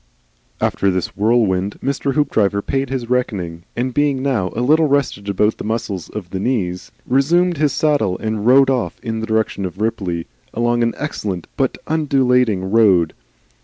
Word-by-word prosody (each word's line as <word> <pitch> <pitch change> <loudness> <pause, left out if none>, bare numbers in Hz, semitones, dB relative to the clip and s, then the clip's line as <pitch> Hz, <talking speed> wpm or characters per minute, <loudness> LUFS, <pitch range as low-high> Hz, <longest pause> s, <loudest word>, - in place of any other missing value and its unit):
After 100 - +1
this 95 -2 -2
whirlwind 105 -3 +1
Mr. 140 0 -2
Hoopdriver 105 -9 +1
paid 135 -1 -1
his 130 -3 -3
reckoning 95 -9 -2
and 125 +1 -2
being 140 -2 +1
now 115 -10 0
a 115 - -1
little 155 +5 +4
rested 135 -8 0
about 105 +2 +1
the - - -5
muscles 105 -5 -3
of 95 -5 -7
the 95 - -3
knees 95 -6 -2
resumed 170 +7 +2
his 150 -1 +2
saddle 140 -11 +1
and 110 -1 -3
rode 135 +1 +6
on 125 -3 0
in 115 -1 -3
the 110 - -4
direction 110 -3 0
of 90 +1 -5
Ripley, 95 -7 -2 0.3
along 120 +1 +1
an 115 0 +1
excellent 100 - -4
but 135 -2 0
undulating 125 -10 +1
road. 100 -7 +4
115 Hz, 165 wpm, -19 LUFS, 100-135 Hz, 0.3 s, rode